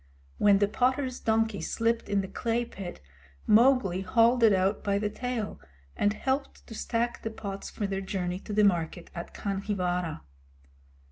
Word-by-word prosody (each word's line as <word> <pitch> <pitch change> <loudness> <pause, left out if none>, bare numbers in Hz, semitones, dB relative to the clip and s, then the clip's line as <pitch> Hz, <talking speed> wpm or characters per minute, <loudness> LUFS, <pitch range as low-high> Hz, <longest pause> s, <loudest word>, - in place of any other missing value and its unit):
When 205 -1 +6
the 205 0 +3
potter's 255 +3 0
donkey 225 -2 +1
slipped 230 0 -1
in 200 -1 +2
the 190 - -5
clay 235 +4 -1
pit, 190 - -8 0.4
Mowgli 225 -5 +4
hauled 230 +5 +3
it 225 -2 +7
out 195 +1 +1
by 200 -1 +1
the 210 0 -1
tail, 240 -2 -4 0.4
and 205 0 +2
helped 265 +5 -2
to - - -10
stack 235 +2 -2
the 225 - -3
pots 200 -3 -6
for 210 - -4
their 195 -1 -2
journey 185 -2 -3
to 210 - -9
the 210 +1 +4
market 175 -3 0
at 170 -1 -7
Khanhiwara. 180 -4 -2
205 Hz, 160 wpm, -28 LUFS, 195-230 Hz, 0.4 s, it